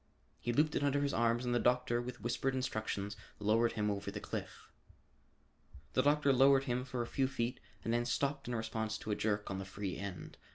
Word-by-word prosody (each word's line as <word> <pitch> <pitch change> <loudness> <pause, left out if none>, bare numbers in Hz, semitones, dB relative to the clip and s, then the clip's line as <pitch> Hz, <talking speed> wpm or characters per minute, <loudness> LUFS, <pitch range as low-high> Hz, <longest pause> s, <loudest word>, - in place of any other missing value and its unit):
He 120 - -1
looped 150 +5 +2
it - - +1
under 145 0 +2
his 140 -1 0
arms 115 +1 +2
and 120 - +1
the 120 - +3
doctor 125 0 +2
with 120 -1 -7
whispered 125 +3 0
instructions, 110 -5 -2 0.2
lowered 110 +3 +3
him 105 -2 0
over 100 -1 -3
the - - -5
cliff. - - -6 1.3
The 130 - +4
doctor 145 0 +4
lowered 135 +1 +6
him 125 -1 -1
for 125 -2 -2
a - - -4
few 130 +2 +1
feet 125 -1 -2 0.2
and 115 - 0
then 120 0 +2
stopped 140 +2 -1
in 120 - -1
response 110 -1 -2
to 110 - -5
a - - +2
jerk 105 -1 -1
on 95 - -2
the - - -3
free 95 0 -4
end. 100 -3 -6
120 Hz, 210 wpm, -35 LUFS, 110-130 Hz, 1.3 s, lowered